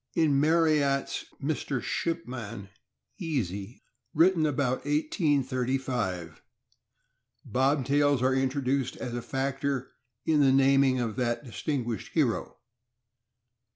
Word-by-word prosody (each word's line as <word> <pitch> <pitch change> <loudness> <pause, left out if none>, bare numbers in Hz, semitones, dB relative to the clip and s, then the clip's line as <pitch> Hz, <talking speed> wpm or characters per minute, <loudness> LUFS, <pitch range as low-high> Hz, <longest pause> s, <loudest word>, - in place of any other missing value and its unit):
In 150 -5 +3
Marryat's 150 -3 +2
"Mr. 145 -1 -2
Midshipman 115 - -4 0.5
Easy," 115 - -3 0.3
written 165 0 +4
about 130 -3 0
1835, 130 - -1 1.1
Bobtails 140 +1 +2
are 130 +1 +3
introduced 135 0 0
as 125 -2 -5
a 120 - -3
factor 135 +1 -2 0.3
in 155 -2 +3
the 135 -2 +5
naming 135 -1 +4
of 115 -1 -2
that 120 +1 -1
distinguished 120 -1 -3
hero. 135 -9 0
135 Hz, 90 wpm, -28 LUFS, 125-145 Hz, 1.1 s, the